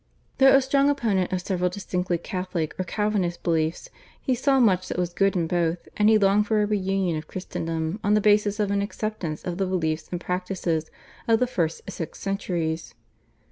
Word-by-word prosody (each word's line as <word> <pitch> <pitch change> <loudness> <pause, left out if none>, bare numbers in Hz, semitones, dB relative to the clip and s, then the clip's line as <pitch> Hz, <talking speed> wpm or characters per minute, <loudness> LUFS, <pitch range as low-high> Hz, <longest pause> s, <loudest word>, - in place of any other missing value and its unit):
Though 270 0 +7
a 275 - +5
strong 275 +1 +3
opponent 215 -10 +1
of 185 -1 -1
several 180 -1 0
distinctly 180 -2 -2
Catholic 180 -2 -3
or - - +1
Calvinist 195 -3 -1
beliefs 165 - -1 0.3
he 260 - 0
saw 270 +2 +2
much 185 -6 +3
that - - -4
was 175 -1 -1
good 195 +2 +2
in 170 -2 +1
both, 170 0 -1
and 210 0 +4
he 220 - +6
longed 205 +1 +3
for 215 -1 +2
a - - +2
reunion 195 -4 0
of 155 - -11
Christendom 165 0 -3
on 205 +1 +3
the - - +4
basis 210 0 +3
of 205 -1 +1
an 200 0 +1
acceptance 200 -6 -4
of 180 +1 -4
the 190 - +1
beliefs 160 -4 -1
and 175 - -2
practices 180 -3 -2 0.4
of 225 -1 +4
the 250 - +3
first 170 -10 -1
six 180 -4 -6
centuries. 170 -5 -2
185 Hz, 190 wpm, -25 LUFS, 175-210 Hz, 0.4 s, Though